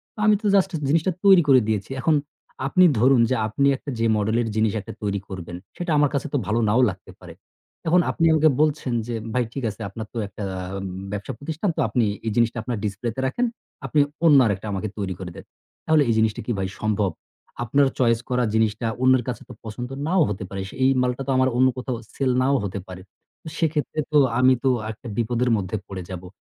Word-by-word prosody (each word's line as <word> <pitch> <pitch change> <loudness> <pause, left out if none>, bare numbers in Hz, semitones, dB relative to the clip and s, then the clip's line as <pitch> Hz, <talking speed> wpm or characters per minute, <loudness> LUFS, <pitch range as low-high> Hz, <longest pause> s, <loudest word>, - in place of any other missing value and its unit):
তো - - -12
আমি 215 -1 +6
তো - - -8
জাস্ট 190 - +3 0.2
জিনিসটা 165 +5 +2
তৈরি 190 -3 +8
করে 130 -2 +7
দিয়েছি 110 +3 -2
এখন 160 +2 +3 0.5
আপনি 185 +6 +5
ধরুন 130 0 +5
যে, 130 - +2
আপনি 140 +6 +1
একটা 145 - -9
যে 115 - +1
মডেল 110 +2 0
এর 115 - -2
জিনিস 110 -1 +2
একটা 115 +3 -9
তৈরি 100 -1 -1
করবেন 90 -2 -7 0.2
সেটা 175 -2 -3
আমার 145 -1 +4
কাছে 140 +2 -1
তো 145 - +3
ভালো 110 +2 +1
নাও 120 +5 +3
লাগতে 95 - -13
পারে। - - -11 0.5
এখন 180 +2 +5
আপনি 165 - 0
আমাকে 155 0 +5
বলছেন 150 -5 +1
যে, 120 - -3 0.2
ভাই 125 0 +2
ঠিক 135 - -5
আছে 110 +2 -9
আপনার 110 +3 -7
তো 120 - -6
একটা 100 +1 -8 0.4
উম 95 - -5 0.3
ব্যবসা 100 -1 -4
প্রতিষ্ঠান 160 +7 -2
তো - - -4
আপনি 125 - +1 0.2
এই 110 - +1
জিনিসটা 120 0 +2
আপনার 120 -1 -3
ডিসপ্লেতে 110 +5 -3
রাখেন, 240 - 0 0.4
আপনি 145 +3 +1 0.3
অন্য 150 -4 +7
আরেকটা 100 +1 -2
আমাকে 100 +3 -2
তৈরি 95 -2 -2
করে 90 -2 -6
দেন। - - -10 0.4
তাহলে 160 -2 +4
এই - - +4
জিনিসটা 110 -1 +1
কি - - -2
ভাই 95 -1 -1
সম্ভব? 105 -3 +1 0.5
আপনার 140 +4 +3
চয়েস 115 -2 +3
করা 125 0 +1
জিনিসটা 110 +1 +1
অন্যের 130 -1 +4
কাছে 125 - -4
তো - - -8
পছন্দ 120 +3 -6 0.2
নাও 185 +2 +3
হতে 100 0 -4
পারে, 95 -1 -5
সেই 130 0 +1
মালটা 125 +1 -1
তো 135 - +1
আমার 130 0 +3
অন্য 130 +1 +5
কোথাও 125 -1 -3 0.2
সেল 130 -2 +1
নাও 140 +2 +2
হতে 100 0 -4
পারে 90 0 -9 0.6
সেক্ষেত্রে 155 -1 -1
তো 150 - +4 0.2
আমি 130 +1 +6
তো 135 - +3 0.2
একটা 110 +3 -11
বিপদের 120 +2 0
মধ্যে 95 +1 -3
পড়ে 95 -2 -6
যাবো। 90 -1 -7
120 Hz, 210 wpm, -23 LUFS, 105-140 Hz, 0.6 s, তৈরি